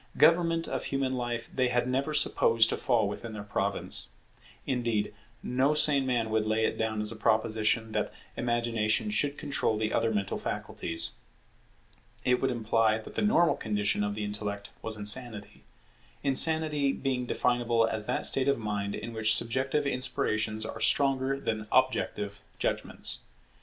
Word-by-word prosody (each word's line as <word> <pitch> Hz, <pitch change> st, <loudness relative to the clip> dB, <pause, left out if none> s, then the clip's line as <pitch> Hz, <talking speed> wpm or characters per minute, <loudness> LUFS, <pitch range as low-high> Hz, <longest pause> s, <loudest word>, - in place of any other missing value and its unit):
Government 165 Hz, -1 st, +4 dB
of -, -, -3 dB
human 135 Hz, -1 st, -1 dB
life 120 Hz, -2 st, -3 dB
they 130 Hz, -1 st, +1 dB
had 125 Hz, 0 st, 0 dB
never 135 Hz, +4 st, -1 dB
supposed 115 Hz, -6 st, +3 dB
to -, -, 0 dB
fall 115 Hz, -5 st, +1 dB
within 110 Hz, +2 st, -6 dB
their 105 Hz, -1 st, -6 dB
province. 100 Hz, -1 st, -3 dB, 0.6 s
Indeed 120 Hz, -5 st, -1 dB, 0.3 s
no 135 Hz, +4 st, +1 dB
sane 140 Hz, -3 st, +3 dB
man 115 Hz, -3 st, 0 dB
would 110 Hz, -1 st, +1 dB
lay 110 Hz, +1 st, +1 dB
it -, -, -1 dB
down 110 Hz, -1 st, -2 dB
as 105 Hz, +1 st, -1 dB
a -, -, -6 dB
proposition 110 Hz, 0 st, +1 dB
that -, -, -1 dB, 0.2 s
Imagination 120 Hz, -, 0 dB
should 145 Hz, -8 st, 0 dB
control 140 Hz, -7 st, -1 dB
the 110 Hz, 0 st, -1 dB
other 115 Hz, -, +1 dB
mental 100 Hz, -3 st, -2 dB
faculties. 80 Hz, 0 st, -3 dB, 1.1 s
It 125 Hz, 0 st, +2 dB
would 135 Hz, -, +1 dB
imply 115 Hz, -2 st, +1 dB
that 110 Hz, -, -10 dB
the -, -, -2 dB
normal 190 Hz, -5 st, +4 dB
condition 105 Hz, -1 st, -1 dB
of 105 Hz, 0 st, -2 dB
the 105 Hz, -, -4 dB
intellect 105 Hz, 0 st, -5 dB
was 110 Hz, -1 st, -3 dB
insanity; 105 Hz, 0 st, 0 dB, 0.6 s
insanity 150 Hz, 0 st, +4 dB
being 130 Hz, -2 st, -2 dB
definable 120 Hz, -2 st, +1 dB
as 110 Hz, -1 st, -2 dB
that 125 Hz, -, -1 dB
state 135 Hz, 0 st, +2 dB
of 140 Hz, -, +3 dB
mind 105 Hz, -2 st, -3 dB
in 115 Hz, +1 st, -6 dB
which 110 Hz, 0 st, +4 dB
subjective 130 Hz, +6 st, +2 dB
inspirations 110 Hz, -5 st, -1 dB
are -, -, -6 dB
stronger 135 Hz, -1 st, +2 dB
than 110 Hz, -5 st, -3 dB
objective 105 Hz, -6 st, 0 dB, 0.2 s
judgments. -, -, -2 dB
115 Hz, 155 wpm, -29 LUFS, 110-135 Hz, 1.1 s, Government